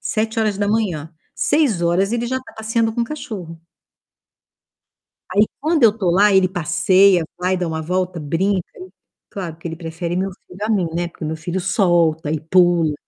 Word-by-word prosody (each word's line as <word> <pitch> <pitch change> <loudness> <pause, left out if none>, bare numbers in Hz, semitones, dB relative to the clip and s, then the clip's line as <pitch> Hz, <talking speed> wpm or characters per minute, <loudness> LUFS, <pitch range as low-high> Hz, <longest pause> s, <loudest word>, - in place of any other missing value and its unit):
7h,. 210 -6 -1 0.2
6h 195 - +1
ele 240 0 -1
já 260 +2 -1
está 260 - -14
passeando 225 0 0
com 235 - -1
o - - 0
cachorro. 190 - -7 1.7
Aí 205 +2 +5 0.2
quando 310 0 +1
eu 225 - +8
estou 200 -5 -1
lá, 205 +3 +5
ele 190 -1 +4
passeia, 185 +1 +3
vai, 185 +1 0
dá 180 - -2
uma 160 -1 -3
volta, 180 0 -2
brinca. 180 +6 0 0.7
Claro 175 -5 -6
que 165 - -10
ele 165 -1 -5
prefere 170 +1 -4
meu 190 +1 -1
filho 180 +1 -16
a 220 - -1
mim, 190 -5 +2
né. 175 0 -1
Porque 165 - -10
o - - -2
meu 160 +1 -3
filho 175 +3 -3
solta 170 -5 +2
e 155 - -1
pula, 170 -1 +3
185 Hz, 170 wpm, -20 LUFS, 170-210 Hz, 1.7 s, eu